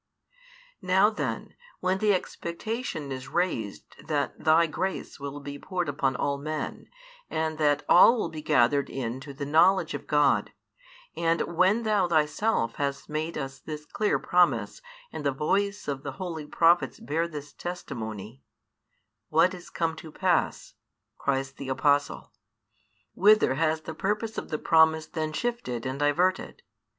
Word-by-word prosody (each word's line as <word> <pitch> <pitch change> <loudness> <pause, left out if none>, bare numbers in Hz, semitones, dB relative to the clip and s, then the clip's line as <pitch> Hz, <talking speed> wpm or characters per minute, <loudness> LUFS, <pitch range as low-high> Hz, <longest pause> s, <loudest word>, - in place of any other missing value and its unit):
Now 190 +3 +4
then, 215 - -4 0.3
when 185 +1 0
the 210 0 +3
expectation 180 - -3
is 130 -1 -6
raised 145 - -3
that 145 -2 -2
Thy 160 +1 +5
grace 185 +2 -4
will 140 +1 -6
be 140 0 -8
poured 180 0 -3
upon 135 -2 0
all 140 +1 -1
men 155 +2 -5 0.4
and 160 0 -2
that 145 -1 +2
all 230 +7 +7
will 215 - -1
be 155 - -7
gathered 140 +1 +2
in 125 -1 -4
to 140 +1 -9
the 140 +1 -5
knowledge 170 +4 +4
of - - -6
God, 145 -2 +2 0.6
and 165 0 +1
when 195 +7 +3
Thou 210 -4 +2
Thyself 155 - +1
hast 140 +1 -3
made 155 +2 -3
us 135 -2 -5
this 150 -1 -7
clear 210 +5 0
promise 180 - +1 0.3
and - - -5
the 140 - +2
voice 200 +9 -1
of 140 -2 -3
the 140 -1 -6
holy 160 -1 -6
prophets 165 -2 +3
bears 165 +5 -1
this 145 -2 -8
testimony 115 - -6 0.9
What 165 +4 +4
is 180 -1 -10
come 165 -1 -1
to 160 - -10
pass? - - 0 0.5
cries 135 -1 -1
the 135 0 -8
Apostle. 145 +2 +1 0.8
Whither 210 -7 +5
has 155 +2 0
the 160 - -7
purpose 210 +6 -2
of - - -9
the 155 - -1
promise 160 0 +4
then 155 -1 -3
shifted 155 - -3
and 130 +1 -3
diverted? 180 - +1
155 Hz, 150 wpm, -27 LUFS, 140-180 Hz, 0.9 s, all